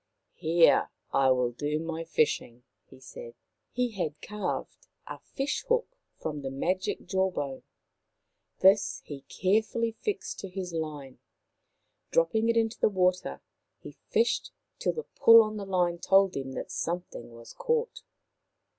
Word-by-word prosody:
" - - -52
Here 165 +1 +4 0.2
I 135 -1 +4
will 125 -2 +2
do 145 +5 -2
my 165 +1 -4
fishing," 135 -7 0 0.3
he - - -15
said. 475 - -10 0.4
He 250 -1 -1
had 160 -8 -3
carved 210 - -5 0.2
a - - -8
fish 275 - -3
hook - - +1 0.2
from 150 -2 -4
the 135 - -4
magic 180 +8 -2
jaw 190 +1 +1
bone. 140 -7 -4 1.0
This 195 +2 +4
he 140 -2 -8
carefully 220 +4 +1
fixed 400 - -4
to 195 - -6
his 180 -1 -5
line. 150 -5 -5 0.9
Drop - - +2
ping 225 +1 +1
it 230 - +2
into 225 0 0
the - - +4
water, 185 -2 0 0.4
he - - -11 0.2
fished 460 - +1 0.3
till - - 0
the 465 - -5
pull 230 - +7
on 215 0 -5
the 200 - -5
line 175 -2 +1
told 195 +1 +4
him 135 -1 -4
that - - -6
something 165 -9 -4
was 115 0 -12
caught. 470 +1 -1
185 Hz, 150 wpm, -28 LUFS, 150-225 Hz, 1.0 s, pull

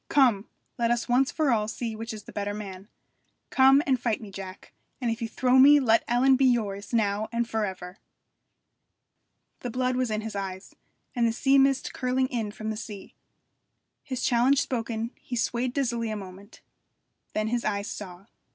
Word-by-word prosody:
'Come! 245 -7 +3 0.3
let 235 -1 +2
us 240 -1 0
once 255 +2 +3
for 310 -4 +1
all 215 -2 +1
see 225 0 -4
which 225 +1 -6
is 215 -1 -8
the - - -12
better 205 0 -3
man. 195 -2 -8 0.6
Come 270 +2 +6
and 260 -3 +2
fight 230 -3 0
me, 210 -3 -10
Jack, 190 0 -9 0.3
and 240 -3 0
if 230 +2 -4
you 230 - -2
throw 255 +3 +3
me 290 +2 +8
let 230 -4 +3
Ellen 255 +3 +4
be 265 +1 +3
yours 210 -5 0
now 215 -2 0
and 235 0 -1
for 220 -2 -1
ever!' 185 -1 -8 1.6
The 245 - -5
blood 255 +1 0
was 255 -1 0
in 215 0 -1
his 220 -1 -6
eyes, 190 -1 -5 0.4
and 235 -1 +2
the - - +1
sea 270 +4 +3
mist 270 0 +2
curling 255 0 0
in 230 -5 -2
from 215 +1 -5
sea. 205 -3 -9 0.9
His 260 -3 -5
challenge 255 +3 +3
spoken, 230 -2 -2
he 250 - -5
swayed 245 +1 -1
dizzily 235 -4 -1
a 215 - -3
moment. 195 +1 -11 0.7
Then 215 0 -1
his 240 0 -1
eyes 200 -1 -1
saw. 185 -2 -8
230 Hz, 180 wpm, -27 LUFS, 210-255 Hz, 1.6 s, me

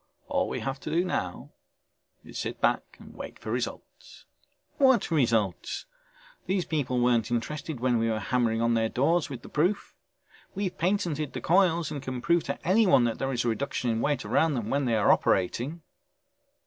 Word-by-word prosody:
All 280 -1 0
we - - -3
have 135 0 -3
to - - -6
do 175 +2 +1
now 180 - -3 0.7
is - - -8
sit - - -4
back - - 0
and - - -13
wait - - -8
for - - -6
results." - - -6 0.5
"What 260 -8 +4
results?! 115 - 0 0.6
These 185 -2 0
people 130 -6 -1
weren't 120 -2 +2
interested 140 +4 -3
when 125 -1 +2
we 115 0 +1
were 110 - 0
hammering 115 0 0
on 115 0 +2
their 115 -1 +1
doors 160 +7 +1
with 130 -4 -7
the - - -10
proof. 180 +7 0 0.6
We've 195 -2 -2
patented 165 -5 -1
the - - -5
coils 170 -3 +3
and 145 - -4
can 130 -1 -4
prove 170 +6 +2
to 140 - -3
anyone 190 - +5
that 115 -1 -1
there 135 0 -1
is 120 -2 -1
a - - +2
reduction 125 0 -1
in 115 0 -1
weight 140 -4 0
around 145 +8 +2
them 115 -3 -3
when 140 0 +1
they 115 -2 +1
are 105 - +4
operating...." 125 - +1
135 Hz, 185 wpm, -27 LUFS, 120-170 Hz, 0.7 s, anyone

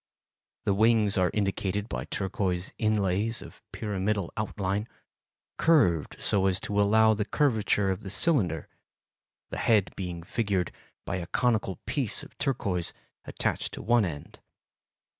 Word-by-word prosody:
The 100 - +2
wings 110 0 +4
are 90 -2 +3
indicated 100 0 -1
by - - -4
turquoise 95 -2 -2
inlays 110 0 +1
of - - -12
pyramidal 100 -3 -2
outline, 105 -1 -2 0.7
curved 90 - +3
so 95 -1 +2
as 95 -1 +1
to - - -4
follow 110 +2 +5
the 105 0 0
curvature 105 -7 +1
of 95 - -3
the 95 - -7
cylinder, 100 - +2 0.8
the - - -5
head 105 -6 +2
being 90 -3 -5
figured 100 -2 -1 0.3
by - - -2
a 85 -1 -5
conical 110 -5 +1
piece 130 -8 0
of - - -14
turquoise 100 - -1 0.3
attached - - -2
to - - -8
one 120 +1 +4
end. 75 -6 -6
100 Hz, 135 wpm, -28 LUFS, 95-110 Hz, 0.8 s, follow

